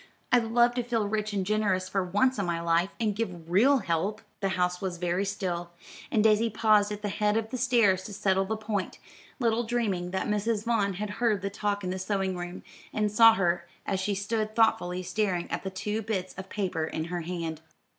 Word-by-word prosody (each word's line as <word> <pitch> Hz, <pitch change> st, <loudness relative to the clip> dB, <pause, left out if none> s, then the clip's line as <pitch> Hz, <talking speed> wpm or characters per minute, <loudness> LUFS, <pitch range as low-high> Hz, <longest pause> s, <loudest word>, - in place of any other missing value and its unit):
I'd 245 Hz, -2 st, +4 dB
love 240 Hz, +1 st, +3 dB
to 245 Hz, 0 st, -1 dB
feel 230 Hz, -3 st, 0 dB
rich 215 Hz, 0 st, -1 dB
and 195 Hz, -2 st, -1 dB
generous 200 Hz, -3 st, +1 dB
for 190 Hz, 0 st, 0 dB
once 205 Hz, +7 st, +1 dB
in 200 Hz, -, 0 dB
my 170 Hz, -1 st, -1 dB
life, 170 Hz, +2 st, +2 dB
and 215 Hz, -3 st, 0 dB
give 180 Hz, -7 st, -4 dB
real 255 Hz, +10 st, +5 dB
help." 190 Hz, +6 st, 0 dB, 0.2 s
The 195 Hz, -, 0 dB
house 180 Hz, 0 st, 0 dB
was 185 Hz, -3 st, -3 dB
very 175 Hz, +2 st, 0 dB
still, 180 Hz, -3 st, -3 dB, 0.4 s
and 215 Hz, -, +2 dB
Daisy 220 Hz, +1 st, +4 dB
paused 215 Hz, -1 st, +3 dB
at 210 Hz, 0 st, -6 dB
the 205 Hz, -, -1 dB
head 210 Hz, +1 st, +1 dB
of 225 Hz, 0 st, -2 dB
the 255 Hz, -, -2 dB
stairs 230 Hz, -7 st, +3 dB
to 210 Hz, -, -7 dB
settle 195 Hz, -1 st, +1 dB
the 220 Hz, +3 st, -2 dB
point, 215 Hz, -3 st, -3 dB, 0.4 s
little 235 Hz, -2 st, +1 dB
dreaming 220 Hz, -7 st, -1 dB
that 190 Hz, +1 st, -2 dB
Mrs. 210 Hz, +1 st, 0 dB
Vaughn 215 Hz, -4 st, +1 dB
had 205 Hz, +3 st, -4 dB
heard 215 Hz, -5 st, +2 dB
the 200 Hz, -, -2 dB
talk 205 Hz, -1 st, -2 dB
in 180 Hz, -, -2 dB
the 190 Hz, -, -3 dB
sewing 190 Hz, -1 st, -1 dB
room, 175 Hz, +1 st, -6 dB, 0.3 s
and 210 Hz, -1 st, 0 dB
saw 225 Hz, +1 st, +7 dB
her 175 Hz, -3 st, 0 dB, 0.2 s
as 195 Hz, -, -1 dB
she 200 Hz, +2 st, -1 dB
stood 215 Hz, +2 st, -2 dB
thoughtfully 220 Hz, -6 st, +2 dB
staring 185 Hz, -2 st, -1 dB
at -, -, -2 dB
the 190 Hz, -, -4 dB
two 210 Hz, +3 st, -3 dB
bits 200 Hz, -4 st, -3 dB
of 190 Hz, 0 st, -9 dB
paper 185 Hz, -6 st, -2 dB
in 160 Hz, -, -3 dB
her 175 Hz, -, -1 dB
hand. 165 Hz, -2 st, -4 dB
200 Hz, 215 wpm, -28 LUFS, 185-220 Hz, 0.4 s, saw